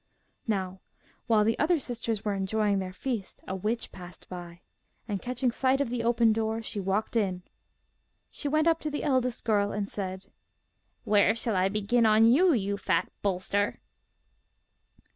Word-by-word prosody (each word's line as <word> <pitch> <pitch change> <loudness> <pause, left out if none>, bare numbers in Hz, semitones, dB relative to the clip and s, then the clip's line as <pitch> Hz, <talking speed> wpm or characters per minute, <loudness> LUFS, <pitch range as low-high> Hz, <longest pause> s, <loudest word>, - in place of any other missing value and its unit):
Now, 190 -3 -2 0.5
while 220 -3 +4
the 225 +2 +1
other 335 +3 +3
sisters 230 -5 -3
were 205 - +1
enjoying 200 +1 0
their 185 -1 -4
feast, 220 0 -5
a 190 - -3
witch 215 +5 -2
passed 175 -2 -12
by, 175 -1 -8 0.5
and 205 -4 -3
catching 250 0 -1
sight 260 +2 +1
of 275 -4 -1
the 240 -2 -2
open 230 -1 +3
door, 220 0 -1
she 215 - -3
walked 195 +4 -1
in. 190 -5 0 0.9
She 290 - -4
went 310 +2 +2
up 330 -1 +3
to 305 - -3
the 295 - -4
eldest 255 -4 0
girl, 205 -2 +2
and 205 -1 -2
said: 190 -2 -5 0.8
'Where 210 +1 +4
shall 230 -2 -1
I 185 +1 +2
begin 215 +3 +2
on 215 +1 +5
you, 315 +11 +5
you 200 -6 0
fat 200 - 0
bolster? 200 +1 0
215 Hz, 160 wpm, -28 LUFS, 195-240 Hz, 0.9 s, on